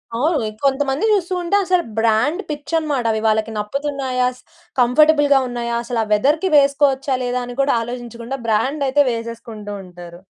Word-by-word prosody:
ఆ! -, -, -2 dB, 0.5 s
కొంతమందిని 275 Hz, +8 st, +1 dB
చూస్తూంటే, 360 Hz, -1 st, -1 dB
అసలు 365 Hz, -1 st, +2 dB
బ్రాండ్ 230 Hz, -, +2 dB
పిచ్చి 295 Hz, +2 st, -6 dB
అనమాట. 290 Hz, -6 st, -2 dB
అవి 220 Hz, 0 st, -1 dB
వాళ్ళకి 220 Hz, +1 st, +1 dB
నప్పుతున్నాయా? 265 Hz, +2 st, -1 dB
స్ -, -, -19 dB, 0.4 s
కంఫర్టబుల్‌గా 285 Hz, +3 st, +4 dB
ఉన్నాయా? 235 Hz, -1 st, -3 dB
అసలు 235 Hz, -1 st, -2 dB
ఆ -, -, -4 dB
వెదర్‌కి 300 Hz, -, +2 dB
వేసుకోవచ్చా? 275 Hz, -1 st, +2 dB
లేదా? 245 Hz, 0 st, -1 dB
అని 245 Hz, -, -8 dB
కూడా 275 Hz, -, +2 dB
ఆలోచించకుండా 240 Hz, +1 st, -6 dB
బ్రాండ్ 270 Hz, +7 st, 0 dB
అయితే 290 Hz, +2 st, +4 dB
వేసేసుకుంటూ 230 Hz, -2 st, -6 dB
ఉంటారు. 175 Hz, 0 st, -12 dB
260 Hz, 145 wpm, -19 LUFS, 230-290 Hz, 0.5 s, కంఫర్టబుల్‌గా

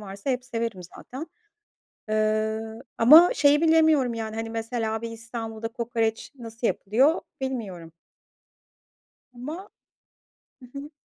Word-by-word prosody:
varsa 200 Hz, +4 st, -5 dB
hep 250 Hz, -1 st, -2 dB
severim 230 Hz, -5 st, -4 dB, 0.2 s
zaten. 270 Hz, +6 st, -8 dB, 0.8 s
Eee, 215 Hz, 0 st, 0 dB, 0.4 s
ama 310 Hz, +10 st, +8 dB
şeyi 290 Hz, +1 st, +4 dB
bilemiyorum 315 Hz, -6 st, +4 dB
yani, 220 Hz, -1 st, -5 dB
hani, 225 Hz, 0 st, -4 dB
mesela 225 Hz, -1 st, -3 dB
bir 230 Hz, 0 st, -5 dB
İstanbul'da 225 Hz, -1 st, -6 dB
kokoreç 230 Hz, -1 st, -2 dB
nasıl 230 Hz, -2 st, -4 dB
yapılıyor, 260 Hz, -, +2 dB, 0.2 s
bilmiyorum. 200 Hz, -11 st, -5 dB, 1.4 s
Ama. 305 Hz, +11 st, -7 dB, 0.9 s
Hı 250 Hz, -, -13 dB
hı. 280 Hz, +1 st, -8 dB
230 Hz, 110 wpm, -25 LUFS, 220-265 Hz, 1.4 s, ama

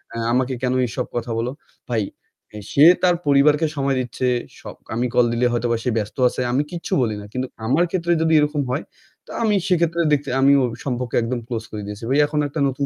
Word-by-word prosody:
এ -, -, -4 dB, 0.2 s
আমাকে 130 Hz, +1 st, +1 dB
কেন 125 Hz, 0 st, 0 dB
এসব 125 Hz, +3 st, -3 dB
কথা 120 Hz, 0 st, -3 dB
বলো?" 120 Hz, +2 st, -1 dB, 0.4 s
ভাই 110 Hz, -3 st, 0 dB, 0.5 s
এ -, -, -6 dB
সে 140 Hz, -, +4 dB, 0.2 s
তার 180 Hz, -1 st, +4 dB
পরিবারকে 145 Hz, +2 st, +4 dB
সময় 140 Hz, -1 st, 0 dB
দিচ্ছে। 125 Hz, 0 st, -2 dB, 0.3 s
স -, -, -16 dB, 0.4 s
আমি 120 Hz, +2 st, 0 dB
কল 125 Hz, -1 st, +4 dB
দিলে 120 Hz, +1 st, +1 dB
হয়তোবা 120 Hz, -1 st, 0 dB
সে 125 Hz, -, 0 dB
ব্যস্ত 105 Hz, +2 st, -4 dB
আছে। 130 Hz, -, -4 dB
আমি 135 Hz, +4 st, +1 dB
কিচ্ছু 170 Hz, -1 st, -5 dB
বলি 110 Hz, -3 st, 0 dB
না। -, -, -10 dB
কিন্তু 130 Hz, +1 st, -2 dB, 0.2 s
আমার 140 Hz, +9 st, +3 dB
ক্ষেত্রে 175 Hz, -2 st, -1 dB
যদি 160 Hz, 0 st, +2 dB
এরকম 150 Hz, 0 st, +1 dB
হয়, 140 Hz, -, -2 dB, 0.4 s
তা -, -, -13 dB
আমি 210 Hz, -2 st, +2 dB
সেক্ষেত্রে 170 Hz, -2 st, +1 dB
দেখতে 140 Hz, -2 st, 0 dB
আমি 140 Hz, +1 st, +6 dB
ওই 125 Hz, -, 0 dB, 0.2 s
সম্পর্ক 125 Hz, -2 st, -3 dB
একদম 120 Hz, +1 st, -2 dB
close 115 Hz, -3 st, -4 dB
করে 105 Hz, -1 st, -5 dB
দিয়েছি। 105 Hz, +2 st, -8 dB
ভাই 140 Hz, -, +3 dB
এখন 150 Hz, 0 st, -2 dB
একটা 145 Hz, +2 st, -5 dB
নতুন 135 Hz, +1 st, -2 dB
130 Hz, 215 wpm, -21 LUFS, 120-150 Hz, 0.5 s, আমি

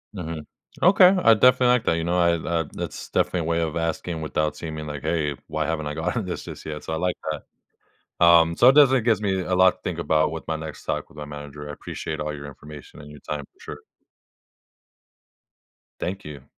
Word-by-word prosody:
Mhm. 80 Hz, -4 st, -6 dB, 0.4 s
Okay, 185 Hz, +1 st, +7 dB, 0.2 s
I 115 Hz, -, +7 dB
definitely 125 Hz, +3 st, +5 dB
like 125 Hz, -1 st, +3 dB
that. 85 Hz, -, +2 dB
You 85 Hz, -, -2 dB
know, 85 Hz, +1 st, 0 dB
I 85 Hz, -1 st, +3 dB
that 80 Hz, -, -9 dB
uh, 85 Hz, -1 st, +1 dB
that's -, -, -6 dB
definitely 90 Hz, -, 0 dB
a -, -, -3 dB
way 85 Hz, 0 st, 0 dB
of 80 Hz, -2 st, -2 dB
asking 80 Hz, 0 st, -3 dB
without 75 Hz, 0 st, -1 dB
seeming, 80 Hz, -2 st, -6 dB
like, 75 Hz, -2 st, -6 dB
"Hey, 75 Hz, -4 st, -1 dB
why 80 Hz, 0 st, -2 dB
haven't 80 Hz, -1 st, -2 dB
I 75 Hz, -, -3 dB
gotten 90 Hz, +7 st, -2 dB
this 90 Hz, -, -5 dB
just -, -, -9 dB
yet?" 75 Hz, -1 st, -6 dB
So, 80 Hz, -, -4 dB
I -, -, 0 dB
like 90 Hz, +1 st, -1 dB, 0.2 s
that. 75 Hz, -, -6 dB, 0.8 s
Um, 85 Hz, -1 st, +6 dB
so 120 Hz, +8 st, +7 dB
it -, -, +6 dB
definitely 135 Hz, -3 st, +6 dB
gives 110 Hz, -3 st, +2 dB
me 95 Hz, -2 st, 0 dB
a 90 Hz, 0 st, -1 dB
lot 95 Hz, 0 st, +6 dB
to -, -, -31 dB
think 90 Hz, -3 st, -4 dB
about 80 Hz, -2 st, +2 dB
with 80 Hz, 0 st, -7 dB
my 80 Hz, -, -1 dB
next 80 Hz, -1 st, -8 dB
talk -, -, -3 dB
with -, -, -19 dB
my 75 Hz, -, -6 dB
manager. 75 Hz, 0 st, -9 dB
I -, -, -5 dB
appreciate 75 Hz, +2 st, -6 dB
all 75 Hz, 0 st, -3 dB
your 70 Hz, -1 st, -8 dB
information 75 Hz, +1 st, -11 dB
and 75 Hz, -, -12 dB
your 75 Hz, -, -12 dB
time 75 Hz, -1 st, -5 dB
for -, -, -34 dB
sure. -, -, -9 dB, 2.2 s
Thank 95 Hz, +3 st, -4 dB
you. 75 Hz, -3 st, -9 dB
80 Hz, 225 wpm, -24 LUFS, 75-90 Hz, 2.2 s, Okay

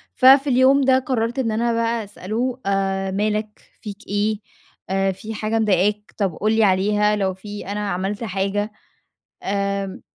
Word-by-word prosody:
ففي 270 Hz, +2 st, +6 dB
اليوم 260 Hz, +2 st, +5 dB
ده 260 Hz, 0 st, +4 dB
قرّرت 245 Hz, -1 st, -2 dB
إن 230 Hz, -4 st, 0 dB
أنا 235 Hz, +2 st, 0 dB
بقى 230 Hz, 0 st, 0 dB
أسأله: 225 Hz, +6 st, -3 dB
"أ 195 Hz, -1 st, 0 dB
مالك؟ 210 Hz, +1 st, -2 dB, 0.2 s
فيك 210 Hz, 0 st, -9 dB
إيه؟ 205 Hz, +1 st, 0 dB, 0.5 s
أ 195 Hz, 0 st, +1 dB
في 215 Hz, +4 st, -7 dB
حاجة 220 Hz, +1 st, -1 dB
مضايقاك؟ 210 Hz, 0 st, +1 dB
طب 195 Hz, -5 st, 0 dB
قُل 215 Hz, +1 st, 0 dB
لي 220 Hz, 0 st, +3 dB
عليها 210 Hz, +2 st, +3 dB
لو 190 Hz, -2 st, 0 dB
في 205 Hz, +1 st, -9 dB
أنا 205 Hz, 0 st, -3 dB
عملت 195 Hz, +5 st, -3 dB
حاجة؟" 200 Hz, +1 st, -2 dB, 0.7 s
آمم 200 Hz, -1 st, -2 dB
210 Hz, 155 wpm, -21 LUFS, 195-225 Hz, 0.7 s, ففي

